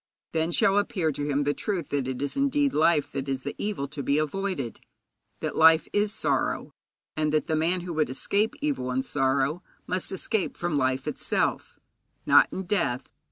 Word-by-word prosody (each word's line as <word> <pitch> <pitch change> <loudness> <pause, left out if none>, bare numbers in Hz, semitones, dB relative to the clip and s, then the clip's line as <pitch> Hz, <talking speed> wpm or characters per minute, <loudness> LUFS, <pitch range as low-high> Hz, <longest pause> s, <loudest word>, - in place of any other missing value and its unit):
Then 160 +1 0
shall 195 +3 +4
appear 180 -5 0
to 145 0 -4
him 145 0 +1
the 145 +1 +1
truth 185 -5 -3
that 140 -3 -1
it 130 +1 -3
is 145 - -3
indeed 280 0 +2
life 155 -1 +3
that 135 0 -4
is 135 -1 -2
the 145 - -4
evil 200 -10 -2
to 145 0 -5
be 140 +1 +1
avoided; 155 - -2 0.6
that - - -3
life 160 0 +6
is 205 0 +2
sorrow, 220 - -1 0.4
and 155 -1 0
that 155 0 +1
the 160 - 0
man 170 +4 +1
who 175 0 -5
would 155 -4 +1
escape 200 - 0
evil 285 - -1
and 130 +1 -1
sorrow 140 +4 +1 0.2
must 185 0 -2
escape 195 +1 -1
from 175 -3 -1
life 130 -1 0
itself - - -1 0.5
not - - +7
in 190 - -4
death. 175 -10 -1
155 Hz, 185 wpm, -27 LUFS, 140-190 Hz, 0.6 s, not